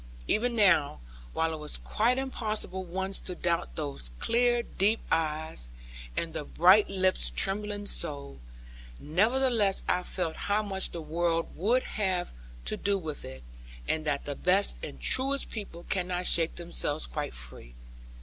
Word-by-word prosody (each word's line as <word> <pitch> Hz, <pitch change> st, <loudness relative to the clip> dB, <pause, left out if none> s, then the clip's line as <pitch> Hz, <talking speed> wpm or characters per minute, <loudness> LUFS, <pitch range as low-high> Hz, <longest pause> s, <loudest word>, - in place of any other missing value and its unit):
Even 235 Hz, +2 st, +1 dB
now, 170 Hz, -, +4 dB, 0.3 s
while 160 Hz, 0 st, 0 dB
it 155 Hz, -, -5 dB
was 150 Hz, 0 st, -5 dB
quite 240 Hz, +4 st, +1 dB
impossible 215 Hz, -7 st, -2 dB
once 190 Hz, +2 st, -2 dB
to 180 Hz, -, -6 dB
doubt 170 Hz, -, -1 dB
those 70 Hz, -4 st, -4 dB
clear 240 Hz, -, +2 dB
deep 210 Hz, +2 st, +1 dB
eyes, 155 Hz, -, 0 dB, 0.5 s
and 165 Hz, -1 st, -2 dB
the -, -, -3 dB
bright 185 Hz, +7 st, +5 dB
lips 190 Hz, -1 st, +1 dB
trembling 205 Hz, +1 st, 0 dB
so; 140 Hz, -, 0 dB, 0.6 s
nevertheless 215 Hz, -, +3 dB
I 180 Hz, -, +2 dB
felt 180 Hz, -3 st, -3 dB
how 210 Hz, +1 st, +3 dB
much 195 Hz, -2 st, -1 dB
the 170 Hz, -2 st, -6 dB
world 165 Hz, +1 st, -1 dB
would 235 Hz, +9 st, +2 dB
have 185 Hz, -4 st, -1 dB, 0.3 s
to -, -, -1 dB
do 200 Hz, 0 st, +1 dB
with 160 Hz, -5 st, -6 dB
it; 65 Hz, -1 st, -9 dB, 0.4 s
and 160 Hz, -, 0 dB
that 145 Hz, -2 st, -1 dB
the 145 Hz, -, -3 dB
best 185 Hz, +7 st, +2 dB
and -, -, -7 dB
truest 270 Hz, +2 st, +1 dB
people 200 Hz, -6 st, -7 dB
cannot 180 Hz, -1 st, -1 dB
shake 165 Hz, -2 st, +2 dB
themselves 170 Hz, -3 st, -1 dB
quite 145 Hz, -2 st, -4 dB
free. -, -, -10 dB
180 Hz, 150 wpm, -29 LUFS, 155-210 Hz, 0.6 s, bright